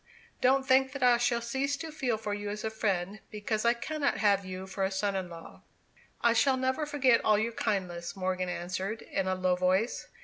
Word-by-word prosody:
Don't 265 +1 +3
think 265 0 +4
that 280 -2 -3
I 245 -1 +6
shall 235 0 +1
cease 270 +4 -1
to 315 +2 -6
feel 255 -7 -1
for 215 -1 -4
you 205 0 -4
as 210 +1 -5
a 220 - -2
friend, 200 -2 -1
because 215 +1 -2
I 235 +1 +4
cannot 290 +4 -1
have 200 -2 +3
you 185 0 -6
for 190 +1 -3
a 190 - +2
son 200 +1 -1
in 185 -2 -3
law." 165 -1 -11 0.6
"I 235 - +4
shall 260 +4 +3
never 260 +4 0
forget 265 -5 +3
all 215 -1 +4
your 220 +2 0
kindness," 185 -6 -2
Morgan 185 -1 -1
answered, 185 +5 -4
in 190 -1 -2
a 185 - +1
low 185 -1 +1
voice. 185 +5 0
215 Hz, 210 wpm, -30 LUFS, 190-250 Hz, 0.6 s, I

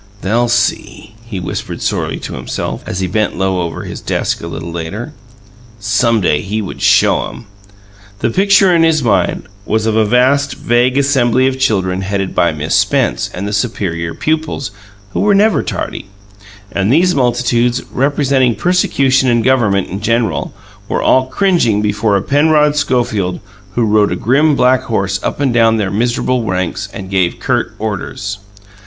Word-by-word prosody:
"They'll 115 +5 +1
SEE!" 115 -2 -1
he 100 -5 -5
whispered 90 - -5
sorely - - -2
to - - -6
himself, - - -5
as 90 - -3
he 95 - 0
bent 105 +2 -1
low 95 -1 0
over 85 -1 -4
his - - -7
desk, - - -2
a 85 - -6
little 85 0 -6
later. 85 - -6 0.7
Some 110 +2 +1
day 75 -5 +1
he 105 +3 -3
would 100 -4 -6
"show - - +3
'em". - - -11 0.7
The 115 - -1
picture 195 - +4
in 165 - +3
his 160 -3 +3
mind 95 -6 +1 0.2
was 110 +1 -1
of 110 -1 0
a 110 - +4
vast, 130 +6 +2
vague 120 +2 +1
assembly 130 -3 +2
of 130 0 -1
people 95 -7 0
headed 95 0 -2
by 85 - +2
Miss 75 0 -3
Spence - - +1
and 100 +3 -5
the 105 - -4
superior 95 -7 -2
pupils 155 -6 -2 0.4
who - - -3
were 205 -1 +3
never 210 +2 +3
tardy, - - -5 0.6
and 100 +3 0
these 180 +5 +3
multitudes, 120 -1 +1
representing 135 -3 +1
persecution 135 -7 +2
and 120 -1 +2
government 110 -7 +2
in 95 +3 -5
general, 115 +1 0 0.4
were - - -1
all 130 0 +3
cringing 165 - +1
before 105 0 0
a 95 - -3
Penrod 150 +1 +3
Schofield 115 -10 0 0.4
who 120 - +2
rode 105 -1 +2
a - - 0
grim 145 +6 +2
black 130 -1 +3
horse 100 -3 -1
up - - -3
and 135 -4 +1
down 115 -1 +3
their 100 -3 -1
miserable 120 +3 0
ranks, 95 0 -3
and 95 -1 -8
gave 95 -3 0
curt - - -1
orders. 105 0 -4
115 Hz, 165 wpm, -15 LUFS, 100-130 Hz, 0.7 s, picture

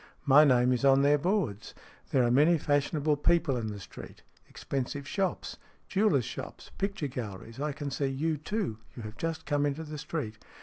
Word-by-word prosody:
My 145 +1 +7
name 125 -3 +4
is 125 - -2
on 135 0 +5
their 145 +1 +4
boards. 170 - -1 0.3
There 130 - +3
are 120 - +2
many 150 +7 +5
fashionable 145 +1 +1
people 165 -2 +2
in 115 -3 -2
the 105 -1 -5
street. 95 - -11 0.3
Expensive 140 +1 -4
shops. 190 +4 -2 0.3
Jewellers' 190 - +2
shops, - - -8
picture 195 -4 -2
galleries. 115 -2 -6
I 150 +1 -1
can 145 0 -5
see 135 +1 -1
you, 150 +4 -1
too. 165 - -3 0.2
You 120 - -7
have 110 0 -8
just 165 +4 -4
come 145 -1 +1
into 145 +2 -1
the 150 -1 -7
street." 115 -9 -4
145 Hz, 180 wpm, -29 LUFS, 125-160 Hz, 0.3 s, My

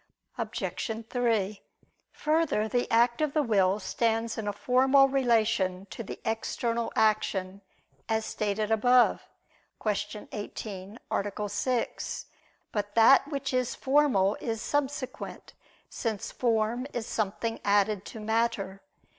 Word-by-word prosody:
Obj. 225 0 -3
3: 220 -5 0 0.5
Further, 305 -8 +1
the 245 +2 0
act 235 +3 +3
of 300 -2 +1
the 305 - +2
will 200 -4 +2
stands 225 +3 0
in 220 -2 -4
a - - +1
formal 265 +5 +4
relation 220 -8 +1
to - - -6
the 215 - -7
external 230 +1 -1
action, 200 -3 +1 0.5
as 220 0 +1
stated 215 +1 -2
above 245 +3 +4 0.6
(Q. 210 0 -3
18, 205 -1 -6 0.2
A. 205 +1 -1
6). 235 +4 -2 0.5
But 205 -1 -3
that 265 +5 +7
which 275 -3 -3
is 255 -1 0
formal 265 -9 +3
is 225 -1 -2
subsequent; 280 0 -3 0.3
since 220 -4 -3
form 235 +1 0
is 235 -2 -3
something 225 +1 -2
added 205 -1 +2
to 225 - -8
matter. 215 -3 -1
225 Hz, 120 wpm, -28 LUFS, 205-245 Hz, 0.6 s, that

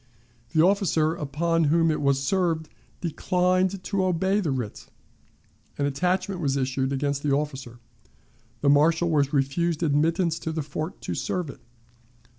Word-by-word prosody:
The 160 - +5
officer 180 -5 +2
upon 165 +2 0
whom 165 +2 +3
it 155 - -2
was 140 -1 +2
served 165 -1 0 0.3
declined 185 +2 0
to 195 -2 -1
obey 190 +2 +1
the 180 -7 -1
writ. 125 -6 -4 0.9
An 140 - 0
attachment 180 +6 -1
was 140 -3 0
issued 130 0 -1
against 140 0 -1
the 145 -1 +1
officer. 135 -5 -4 0.8
The 140 - +3
marshal 160 +4 +4
was 145 -3 +2
refused 155 +4 0
admittance 165 +3 +1
to 160 - -4
the 160 -1 -3
fort 155 +4 -5
to - - -4
serve 175 -6 -2
it. - - -16
160 Hz, 145 wpm, -25 LUFS, 140-175 Hz, 0.9 s, The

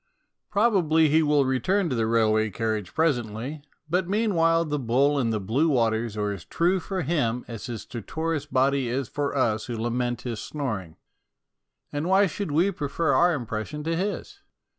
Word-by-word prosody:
Probably 180 -8 +3
he 160 +2 +4
will 150 -2 +3
return 170 - +1
to - - 0
the 115 -1 +1
railway 110 -1 +2
carriage 110 -2 -2
presently, 130 -2 -1 0.3
but 180 +2 0
meanwhile 170 -6 +2
the 150 -1 -2
bull 135 +4 +2
and 115 -4 +1
the 110 - 0
blue 120 +12 +1
waters 115 -4 +1
are 105 -1 0
as 95 -4 -6
true 175 - +1
for 185 +1 -3
him 125 -6 0
as 115 -3 -7
his 115 -3 -5
stertorous 155 +6 -4
body 135 -1 +2
is 130 +1 -2
for 145 +2 -2
us 110 -4 +1
who 120 -2 -4
lament 120 +1 -2
his 120 -3 -4
snoring. 105 - -4 1.0
And 145 +3 -2
why 195 +2 +5
should 195 0 -3
we 170 +7 +2
prefer 155 -2 -1
our 175 -1 +4
impressions 125 +4 -5
to 165 0 0
his? 205 - -3
140 Hz, 170 wpm, -25 LUFS, 115-165 Hz, 1.0 s, why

